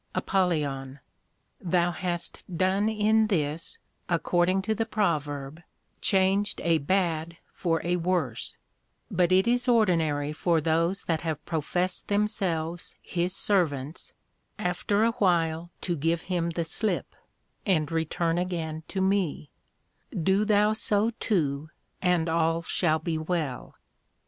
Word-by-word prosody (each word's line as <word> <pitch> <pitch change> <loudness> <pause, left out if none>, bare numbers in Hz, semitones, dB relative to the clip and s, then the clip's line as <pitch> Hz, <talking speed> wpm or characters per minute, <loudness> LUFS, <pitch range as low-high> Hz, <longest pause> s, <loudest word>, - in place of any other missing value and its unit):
APOL. 145 -8 0 0.7
Thou 175 -2 +2
hast 175 0 -4
done 190 +4 +2
in 220 0 +3
this, 160 -4 -2 0.3
according 175 +2 +2
to 220 - 0
the 225 +1 -1
Proverb, 150 -8 -1 0.4
changed 195 +1 +2
a 165 -2 +3
bad 165 0 0 0.2
for 165 -2 -1
a 175 +1 +1
worse; 165 -9 -1 0.6
but 175 0 +2
it 185 +1 +5
is 245 +2 +2
ordinary 165 -11 +2
for 165 +1 +2
those 165 +5 +1
that 165 -2 -1
have 160 -3 -3
professed 180 +3 -1
themselves 185 -5 -1
his 180 +2 -2
Servants, 160 -8 0 0.5
after 200 +4 0
a 230 - +4
while 170 -5 +1
to 175 - -1
give 165 +2 0
him 175 -2 -1
the 170 0 -2
slip, 210 +6 -2 0.5
and 160 -7 +1
return 165 +1 0
again 165 -3 -3
to 190 - -2
me: 190 -6 0 0.6
Do 190 +5 +1
thou 210 0 +4
so 215 +1 +1
too, 150 -6 0 0.3
and 180 -3 +2
all 165 0 +1
shall 165 -2 +1
be 160 0 -2
well. 155 -5 -3
175 Hz, 125 wpm, -27 LUFS, 160-190 Hz, 0.7 s, it